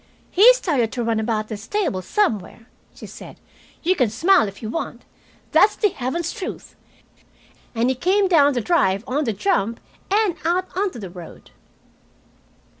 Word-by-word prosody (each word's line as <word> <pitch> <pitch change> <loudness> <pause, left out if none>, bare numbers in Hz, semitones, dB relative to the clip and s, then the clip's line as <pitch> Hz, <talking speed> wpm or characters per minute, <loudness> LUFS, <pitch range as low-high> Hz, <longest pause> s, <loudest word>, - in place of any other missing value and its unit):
"He 425 +7 +8
started 275 - 0
to 245 - -2
run 225 -1 0
about 215 -1 -1
the 215 - -5
stable 235 - -2
somewhere," 225 - -1 0.3
she - - -11
said. - - -12 0.4
"You 365 +3 +2
can 250 - +2
smile 335 - +3
if 195 +3 -10
you - - -3
want. 330 +10 -5 0.5
That's 415 - +5
the 415 - +2
heaven's 325 +4 -3
truth. 375 - -7 1.0
And 230 +2 +1
he 260 - +2
came 380 +8 +2
down 290 -6 +4
the 245 - -1
drive 200 - +1
on 285 +4 -1
the 225 - 0
jump 230 - 0 0.3
and 400 -4 +1
out 360 +3 -1
onto 380 -5 -1
the 195 -6 -8
road." 175 -2 -12
265 Hz, 160 wpm, -21 LUFS, 220-370 Hz, 1.0 s, He